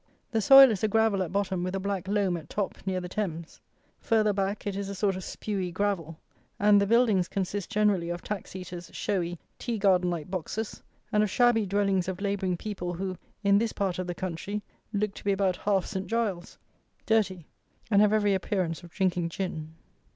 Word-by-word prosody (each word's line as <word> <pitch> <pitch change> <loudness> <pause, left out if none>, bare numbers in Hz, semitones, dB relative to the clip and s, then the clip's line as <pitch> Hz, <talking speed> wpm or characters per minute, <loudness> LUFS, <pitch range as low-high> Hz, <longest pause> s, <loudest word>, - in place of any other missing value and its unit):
The 225 -2 +1
soil 270 +3 +9
is 205 -2 -3
a - - +4
gravel 220 -2 +2
at 180 - -2
bottom 190 -2 -1
with 185 +1 -2
a - - -1
black 195 -1 -3
loam 200 -3 +1
at 160 -3 -8
top 205 -2 -2
near 185 -1 0
the 180 - -5
Thames; 170 -4 -4 0.4
further 215 -2 +2
back 195 +1 -2
it 200 -2 -2
is 200 0 -3
a 200 - -5
sort 195 0 +1
of 185 - -5
spewy 190 -3 -3
gravel; 170 -4 -2 0.4
and 205 0 +5
the 200 - +1
buildings 220 -5 +3
consist 195 0 -3
generally 200 -5 +2
of 175 0 -4
tax 205 -2 -5
eaters' 180 -2 -7
showy, 175 -3 -1 0.2
tea 235 -2 -2
garden 185 -3 +3
like 170 -3 -3
boxes, 200 +4 -4 0.3
and 210 -2 +3
of 210 - +2
shabby 240 -2 +3
dwellings 195 -2 +1
of 190 -1 -3
labouring 195 -3 -1
people 180 -3 -4
who, 185 +1 -3 0.3
in 200 0 +5
this 225 0 -1
part 190 -3 -1
of 185 - -3
the 175 - -3
country, 190 +3 -4 0.3
look 210 -1 -1
to - - -11
be 200 - +2
about 195 -2 +1
half 195 -3 +1
Saint 190 -2 -4
Giles's: 210 -6 -2 0.5
dirty, 195 -7 +1 0.5
and 200 -1 +6
have 210 -1 +5
every 205 -2 +3
appearance 185 -3 -1
of 175 - -12
drinking 180 -2 0
gin. 160 -3 -5
195 Hz, 200 wpm, -28 LUFS, 180-210 Hz, 0.5 s, soil